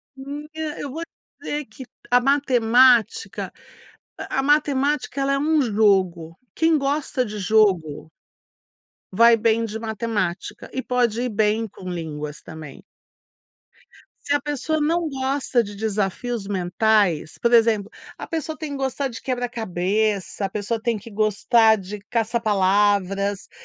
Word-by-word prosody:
Menina, 295 +3 -6
eu 285 - -5
vou 320 +5 -6
te 335 - -8 0.3
dizer 295 0 -3
que 220 +4 -11 0.3
a 245 0 +5
matemática 255 - +3 0.8
a - - 0
matemática 290 -1 +1
ela 275 0 +1
é 275 - +1
um 310 +1 +2
jogo. 190 -8 +1 0.2
Quem 325 -1 +3
gosta 280 -2 -1
de 210 -1 -6
jogo 185 -7 +1 1.1
vai 230 +2 +6
bem 225 +1 +2
de 220 -1 -4
matemática. 220 -5 -3
E 260 - -2
pode 240 -3 0
ir 250 - -1
bem 215 +1 +1
com 185 -1 -12
línguas 150 -4 -5
também. 155 -4 -10 1.4
Se 285 - +1
a 290 - +3
pessoa 295 +2 -2
não 325 +2 0
gosta 265 -2 0
de 205 -2 -7
desafios 210 +1 -2
mentais, 190 -3 +1
por 235 - +1
exemplo, 220 -3 +3 0.3
a - - -6
pessoa 315 -1 -4
tem 310 -1 -6
que 280 - -4
gostar 270 +1 -2
de 230 - -9
quebra-cabeça, 215 -5 -1
a - - -3
pessoa 215 +3 -3
tem 235 -2 0
que 225 +3 -12
gostar 220 +2 +3
de 200 +1 -7
caça-palavras, 205 -3 +1
225 Hz, 135 wpm, -22 LUFS, 200-270 Hz, 1.4 s, vai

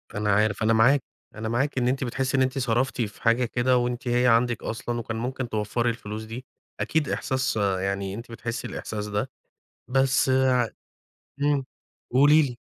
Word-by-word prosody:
أنا 105 0 +1
عارف، 105 0 +1
أنا 110 +1 +4
معا 125 +6 +5 0.4
أنا 110 +1 -4
معاكِ 135 +5 0
إن 125 -1 +2
أنتِ 130 +1 0
بتحسّي 130 +2 -1
إن - - +3
أنتِ 130 +1 0
صرفتِ 125 0 0
في 105 -2 -4
حاجة 115 +2 +3
كده، 125 +2 +2
وأنتِ 120 0 -2
هي 120 +1 +3
عندِك 120 0 +3
أصلًا 120 +1 -3
وكان 110 -1 -4
ممكن 125 +1 -3
توفَّري 110 +2 0
الفلوس 110 -2 -5
دي، 115 +4 -8 0.3
أكيد 155 -3 0
إحساس 130 -3 -1
يعني 95 -1 -1
أنتِ 115 +3 -8
بتحسّي 115 0 -4
الإحساس 105 -1 -5
ده، 105 +5 -2 0.6
بس 135 +1 +2
ع 130 -2 +3 0.7
إمم، 145 -2 +2 0.5
قولي 145 +5 +6
لي. 130 -5 -2
120 Hz, 170 wpm, -25 LUFS, 110-130 Hz, 0.7 s, قولي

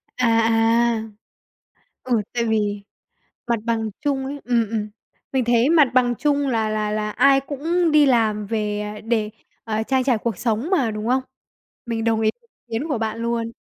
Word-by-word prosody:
À, 250 - +1
à. 225 0 +2 1.0
Ừ, 245 -4 +1
tại 235 -1 0
vì 210 -2 0 0.6
mặt 235 -1 +1
bằng 225 -2 -1
chung 280 -3 -1
ấy 285 +1 -6
ừm, 235 -3 +1
ừm, 215 -2 -2 0.4
mình 260 -2 +1
thấy 240 +3 +3
mặt 310 -5 +5
bằng 245 -1 +3
chung 285 +2 0
là 225 -3 0
là 215 -1 -1
là 210 0 -2
ai 275 +5 +4
cũng 320 +5 -1
đi 300 -1 +6
làm 220 -5 +2
về 210 -1 -2 0.2
để, 220 -2 0 0.3
ờ, 220 -1 -1
trang 260 +3 0
trải 250 -4 +2
cuộc 220 -3 -3
sống 235 +6 -1
mà, 280 - +2
đúng 215 +1 -4
không? 260 +1 +2 0.6
Mình 225 -1 -2
đồng 225 -1 +1
ý 215 -1 +3 0.4
kiến 235 +7 -3
của 280 -6 -1
bạn 220 0 -3
luôn. 230 -1 -2
230 Hz, 175 wpm, -22 LUFS, 220-265 Hz, 1.0 s, đi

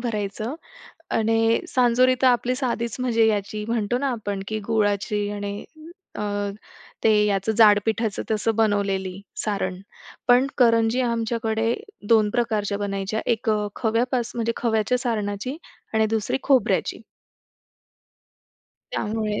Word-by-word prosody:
भरायचं 215 +1 -3 0.6
आणि 225 +1 +2
सांजोरी 255 +1 +3
तर 260 - +6
आपली 250 0 +2
साधीच 235 -4 -2
म्हणजे 235 -3 +2
याची 210 0 -1
म्हणतो 230 0 0
ना, 280 +2 -1
आपण 205 -4 -4
की 220 +1 -2
गुळाची 205 -1 0
आणि 205 0 -5 0.5
अ, - - -4 0.8
ते 225 - +5 0.2
याचं 200 +1 +1
जाड 210 -2 +7
पिठाचं 220 -1 -1
तसं 220 +1 0
बनवलेली 200 -3 0 0.2
सारण. 190 -3 -2 0.5
पण 250 +2 +5
करंजी 230 -1 +4
आमच्याकडे 230 -1 0 0.4
दोन 220 -2 +5
प्रकारच्या 215 -3 0
बनायच्या, 200 +1 -2
एक 230 -1 0
अ, 210 -1 +1
खव्यापास 240 +1 0
म्हणजे 230 -1 0
खव्याच्या 225 +1 +1
सारणाची 225 +1 -2 0.4
आणि 220 0 +3
दुसरी 220 +4 -1
खोबऱ्याची. 265 -6 +2 1.9
त्यामुळे 215 -1 -2
220 Hz, 120 wpm, -24 LUFS, 205-235 Hz, 1.9 s, जाड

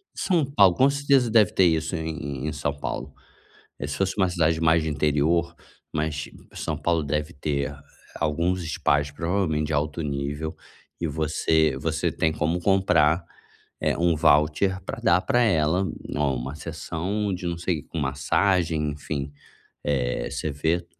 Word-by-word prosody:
São 170 -6 +1
Paulo, 100 -10 +5
com 135 +2 +5
certeza 140 -3 +2
deve 110 -4 +5
ter 95 - +4
isso 80 +1 +1
em 80 -1 -3
em 70 0 -4
em 75 - -2
São 70 -1 -2
Paulo, 70 - -5 0.7
eh, - - -3
se - - -4
fosse 95 -1 0
uma 95 -2 +3
cidade 80 -2 +1
mais 80 0 +4
de 80 - -1
interior, 75 +3 +1 0.4
mas 75 0 -2 0.2
São - - -3
Paulo 85 -2 0
deve 75 +3 -2
ter 70 0 -2 0.4
alguns 85 +4 0
spas, 75 -3 0
provavelmente 80 -1 -1
de 80 - -3
alto 75 +2 -1
nível 75 +2 -3 0.5
e 85 - 0
você 80 -1 +1
você 80 +3 -1
tem 80 - +1
como 80 +3 -1
comprar, 90 -4 +3 0.6
eh, - - +1
um 85 0 +3
voucher 75 +6 +3
para - - -5
dar 85 +2 +3
para 120 - +2
ela, 90 -2 +2 0.3
oh, 75 -2 +1
uma 65 +4 -5
sessão 85 +6 -3
de 90 0 -5
não 85 -1 -2
sei 85 -3 -1
com 80 - -7
massagem, 75 +3 +1
enfim, 70 -1 -5 0.5
eh, 65 -4 -1
você 80 - -3
vê 80 +5 0
80 Hz, 160 wpm, -25 LUFS, 75-90 Hz, 0.7 s, Paulo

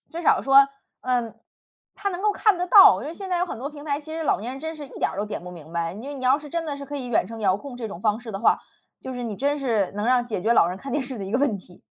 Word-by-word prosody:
至 340 +1 -6
少 - - +4
说， 275 0 +6 0.4
嗯， 240 -3 -1 0.6
他 400 -1 -2
能 360 +2 -5
够 425 - +3
看 425 -3 +3
得 360 - -1
到。 365 - +8
因 285 - -5
为 325 - -6
现 385 +1 -7
在 360 -1 0
有 360 - +1
很 230 - -6
多 280 +4 -5
平 290 0 -11
台， 285 -1 -1
其 315 +1 -10
实 325 0 -3
老 - - +2
年 235 +4 -4
人 270 - -8
真 320 +1 -5
是 290 -2 -8
一 - - -12
点 - - +1
儿 - - -9
都 205 - 0
点 210 - -5
不 180 - -8
明 165 -2 -12
白。 170 +1 -2
你 215 - -9
就 285 - -5
你 260 -2 -7
要 260 +3 +4
是 295 -1 -11
真 335 +2 -2
的 295 -3 -4
是 280 - -7
可 290 - -7
以 260 - -5
远 235 - +2
程 225 0 -8
遥 190 -3 +3
控 255 +4 -9
这 235 -3 -5
种 195 -4 -8
方 215 +2 +1
式 230 - -8
的 195 - -4
话， 225 - +3 0.4
就 260 - -6
是 245 - -5
你 220 -3 -4
真 285 +2 0
是 225 -8 0
能 205 +2 -3
让 245 -1 +3
解 210 -6 -3
决 225 - +3
老 170 - +5
人 180 +2 -5
看 275 +5 -7
电 290 +1 0
视 255 -2 -5
的 195 - -4
一 195 - -6
个 245 - +2
问 270 -8 +1
题。 180 -1 -17
255 Hz, 365 characters per minute, -24 LUFS, 215-295 Hz, 0.6 s, 到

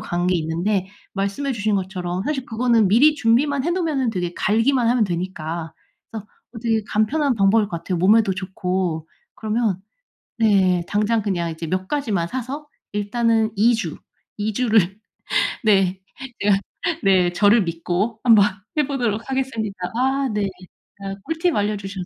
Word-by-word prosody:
간 175 +1 -2
게 180 - +2
있는데 175 +5 -1 0.3
말씀해 200 +8 -2
주신 215 -2 0
것처럼 185 -1 -3
사실 285 -4 -2
그거는 230 -2 +2
미리 270 +10 +5
준비만 275 +2 +2
해 340 - 0
놓으면은 315 -9 0
되게 175 -4 -3
갈기만 230 +3 +2
하면 240 -2 +3
되니까 170 -3 -4 0.4
그래서 215 -2 -7 0.3
어 225 - -8
되게 225 -2 +1
간편한 260 +6 +1
방법일 205 +1 +3
것 170 - -4
같아요 180 +2 -3
몸에도 200 +2 +4
좋고. 185 -3 -3 0.3
그러면 215 -3 -1 0.6
네 190 -5 +3
당장 210 +2 +1
그냥 175 -5 -1
이제 165 +1 -6
몇 185 +3 -2
가지만 220 -12 -1
사서 260 - -5 0.3
일단은 220 +1 +1
2 230 +4 +4
주, 180 -9 -4 0.4
2 215 +1 -1
주를 215 -5 +2 0.7
네 195 -3 +3 0.4
제가 200 -1 +4 0.5
네 185 -3 +3
저를 205 +3 +4
믿고 180 +6 -2
한번 225 -5 +6 0.3
해 300 - +3
보도록 240 -6 -2
하겠습니다. 240 -7 -2 0.2
아 265 +2 +1
네. 210 -1 0 0.5
아 195 0 -5
꿀팁 325 +2 0
알려주셔서 200 -3 -2
210 Hz, 300 characters per minute, -21 LUFS, 185-235 Hz, 0.7 s, 한번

